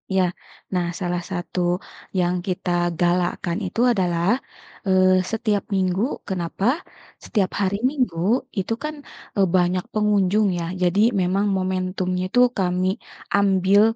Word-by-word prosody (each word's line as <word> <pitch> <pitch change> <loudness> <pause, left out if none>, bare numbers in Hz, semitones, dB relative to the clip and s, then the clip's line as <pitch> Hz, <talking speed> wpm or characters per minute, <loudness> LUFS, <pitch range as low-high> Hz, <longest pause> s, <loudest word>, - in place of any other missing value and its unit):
Ya, 190 - +4 0.5
nah, 175 -1 +1
salah 175 -1 -1
satu 180 0 -4 0.6
yang 180 0 +2
kita 180 0 -2 0.3
galakan 175 0 +1
itu 185 +5 -2
adalah, 185 +3 +1 0.5
eee, 185 0 +5
setiap 215 -1 -1
minggu 190 +6 0
kenapa? 185 0 -3 0.6
Setiap 195 -4 0
hari 195 +1 +1
Minggu 255 - 0 0.4
itu 195 +4 -1
kan, 305 0 -3 0.4
eee, 195 -1 +4
banyak 180 0 +2
pengunjung 210 -1 +3
ya 170 - -2 0.2
jadi 180 +3 +2 0.2
memang 190 +3 +1
momentumnya 185 0 -1
itu 245 - +1 0.2
kami 180 0 +1 0.5
ambil, 195 0 +4
185 Hz, 120 wpm, -23 LUFS, 180-200 Hz, 0.6 s, eee